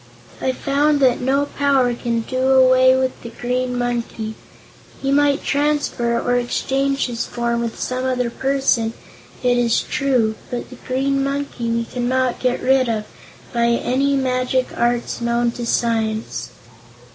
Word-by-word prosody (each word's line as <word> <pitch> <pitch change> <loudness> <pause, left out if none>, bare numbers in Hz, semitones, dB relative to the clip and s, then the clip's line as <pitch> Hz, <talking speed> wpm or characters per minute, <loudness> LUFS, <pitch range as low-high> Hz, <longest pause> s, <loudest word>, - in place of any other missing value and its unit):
I 260 - +1
found 285 +3 +1
that 255 -2 +3
no 275 +3 +2
power 275 -4 +1
can 235 -1 -2
do 260 +3 +1
away 260 0 +6
with 260 0 -1
the 235 - -7
Green 250 +1 -2
Monkey. 235 -2 -2 0.7
He 275 - -1
might 285 0 +3
transfer, 285 -5 0
or 245 0 +1
exchange 275 +3 0
his 235 -2 -3
form 235 -1 -1
with 230 -1 -4
some 255 0 -2
other 250 -2 0
person, 265 -4 +1 0.5
it 245 -1 +3
is 235 -2 +2
true; 250 -6 +1 0.2
but 245 +1 -5
the 255 - -10
Green 275 +1 0
Monkey 275 -4 -3
we 230 0 0
cannot 250 +1 -1
get 250 -1 0
rid 260 -1 +3
of 215 -2 -1 0.5
by 235 -1 +2
any 260 +4 +1
magic 255 -1 0
arts 240 0 0
known 235 0 +1
to 240 0 -5
science." 220 - -1
250 Hz, 145 wpm, -20 LUFS, 235-270 Hz, 0.7 s, away